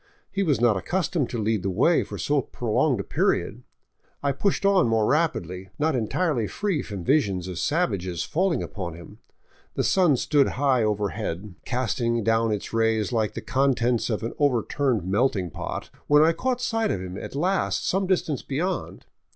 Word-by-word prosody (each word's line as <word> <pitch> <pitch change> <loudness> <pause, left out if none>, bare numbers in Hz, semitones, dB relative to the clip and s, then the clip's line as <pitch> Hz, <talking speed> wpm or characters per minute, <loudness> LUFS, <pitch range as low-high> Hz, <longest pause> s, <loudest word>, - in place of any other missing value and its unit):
He 200 - -1
was 155 -8 +2
not 120 -3 +4
accustomed 170 - -1
to 120 - -4
lead 110 -1 0
the 95 - -2
way 160 - +3
for - - -6
so 145 -1 +1
prolonged 115 -2 0
a - - -2
period. - - 0 0.6
I 140 - +2
pushed 195 +8 0
on 195 -7 +4
more 110 -1 +2
rapidly, 95 - 0
not 155 -1 +1
entirely 125 - 0
free 195 -8 -1
from 100 -6 -6
visions 100 - +1
of 90 -1 -5
savages 100 - -1
falling 180 +2 0
upon 90 -5 -5
him. 85 -1 -13 0.6
The - - 0
sun 175 -8 +3
stood 140 +2 +3
high 135 -3 +3
over 105 -2 0
head, 100 -2 -5
casting 120 -2 -1
down 115 0 +2
its 105 +1 -4
rays 110 -1 +1
like 110 -3 0
the - - -4
contents 125 -3 +1
of 110 -1 -2
an 115 - -3
overturned 130 - +1
melting 95 -3 +1
pot, - - -6 0.2
when 150 +1 +6
I 165 +1 +4
caught 250 +5 -1
sight 225 -3 0
of - - -1
him 90 0 -6
at 100 - -7
last 185 +7 0
some 190 +1 +1
distance 170 -7 0
beyond. 175 +7 -3
120 Hz, 175 wpm, -25 LUFS, 105-155 Hz, 0.6 s, when